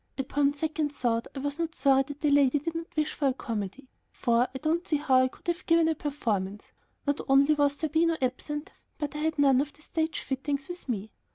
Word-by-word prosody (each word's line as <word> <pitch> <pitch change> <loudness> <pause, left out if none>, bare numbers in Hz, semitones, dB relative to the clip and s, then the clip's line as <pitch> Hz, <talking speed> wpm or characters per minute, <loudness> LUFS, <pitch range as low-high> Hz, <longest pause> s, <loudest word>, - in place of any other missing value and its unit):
Upon 280 +1 +1
second 310 0 -1
thought, 230 -3 0
I - - -3
was 285 +2 -3
not 330 -1 -2
sorry 270 0 +4
that 285 0 -8
the 300 -2 +2
lady 280 -1 +5
did 315 +3 -3
not 330 0 -4
wish 305 0 +1
for 285 - 0
a 265 - +2
comedy, 225 +2 -5 0.2
for 235 +1 +2
I - - -1
don't 325 +6 -1
see 310 - +1
how 270 -3 +3
I 255 - +3
could - - -16
have 345 +1 -2
given 330 -1 +5
a 320 - +3
performance; 215 -10 -3 0.3
not 285 0 0
only 280 +3 +6
was 285 -1 +2
Zerbino 320 +2 +1
absent, 295 +4 -3 0.3
but 295 -2 -3
I - - -3
had 315 +1 0
none 275 -2 +5
of 290 0 -4
the 305 - -15
"stage 320 0 -2
fittings" 275 +1 -3
with 355 -5 -7
me. 215 -2 -3
285 Hz, 220 wpm, -28 LUFS, 265-310 Hz, 0.3 s, only